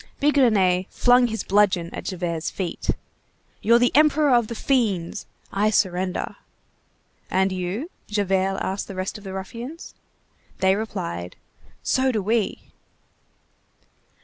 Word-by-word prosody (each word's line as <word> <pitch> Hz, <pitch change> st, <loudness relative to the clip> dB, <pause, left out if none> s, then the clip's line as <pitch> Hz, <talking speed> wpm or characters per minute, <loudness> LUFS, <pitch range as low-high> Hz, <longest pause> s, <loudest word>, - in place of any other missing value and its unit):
Bigrenaille 215 Hz, -11 st, +3 dB
flung 245 Hz, 0 st, +4 dB
his 225 Hz, -1 st, -3 dB
bludgeon 190 Hz, -4 st, +2 dB
at -, -, -6 dB
Javert's 170 Hz, -4 st, -2 dB
feet. 185 Hz, -3 st, -5 dB, 0.7 s
"You're 230 Hz, +2 st, +5 dB
the 245 Hz, 0 st, +2 dB
emperor 300 Hz, -1 st, +5 dB
of 240 Hz, -3 st, +4 dB
the 235 Hz, -, -5 dB
fiends! 215 Hz, -11 st, 0 dB, 0.3 s
I 210 Hz, +2 st, +2 dB
surrender." 185 Hz, -3 st, 0 dB, 0.9 s
"And 190 Hz, +1 st, +2 dB
you?" 185 Hz, -, -3 dB, 0.2 s
Javert 195 Hz, -2 st, 0 dB
asked 190 Hz, +1 st, -3 dB
the 195 Hz, -, -8 dB
rest 185 Hz, +3 st, -4 dB
of -, -, -16 dB
the 190 Hz, -1 st, -7 dB
ruffians. 235 Hz, -, -7 dB, 0.6 s
They 190 Hz, 0 st, +3 dB
replied:— 90 Hz, -, -4 dB, 0.5 s
"So 260 Hz, 0 st, +2 dB
do 220 Hz, -, 0 dB
we." 220 Hz, +1 st, -1 dB
200 Hz, 120 wpm, -24 LUFS, 185-240 Hz, 0.9 s, You're